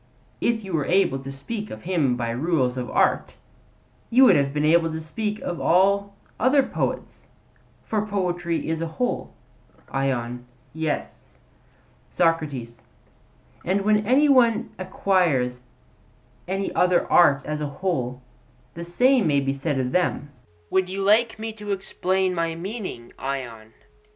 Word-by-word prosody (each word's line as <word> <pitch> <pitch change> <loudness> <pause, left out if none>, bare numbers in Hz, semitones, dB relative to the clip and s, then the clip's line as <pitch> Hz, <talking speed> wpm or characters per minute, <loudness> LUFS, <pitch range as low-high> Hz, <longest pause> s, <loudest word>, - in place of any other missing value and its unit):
If 230 -2 0
you 190 -2 -7
were 150 -4 0
able 175 -7 +2
to 135 +1 -7
speak 205 +11 -6
of 110 - -9
him 160 -9 +1
by 120 -1 -2
rules 130 -1 0
of 125 -2 -4
art, - - +1 0.7
you 260 +3 +6
would - - +7
have 140 -1 +2
been 150 +1 0
able 165 +1 +3
to 160 - -4
speak 210 +7 -4
of 175 - -4
all 200 +3 +2 0.2
other 265 +3 +4
poets; - - -4 0.6
for 215 -2 -1
poetry 175 -4 -2
is 160 0 -2
a 165 - -1
whole. 250 - -2 0.6
ION: 125 -2 -2 0.3
Yes. 150 - -4 0.7
SOCRATES: 145 -9 -1 0.8
And 190 +3 0
when 210 +1 +2
any 275 +5 +4
one 240 -5 +3
acquires 175 -10 +1 0.9
any 195 +2 -2
other 180 -1 +3
art 145 -5 +5
as 150 0 -3
a 150 - -1
whole, 135 -5 -3 0.5
the 170 - -7
same 245 +5 +3
may 145 -2 +3
be 135 0 -1
said 140 0 -2
of 125 -1 -1
them. 175 -5 0 0.4
Would 190 -1 +1
you 195 +1 -3
like 225 +4 +3
me 220 0 -5
to 210 -1 -6
explain 190 -1 -1
my 165 -1 -1
meaning, 185 - -6
Ion? 120 -5 -5
170 Hz, 145 wpm, -24 LUFS, 135-200 Hz, 0.9 s, would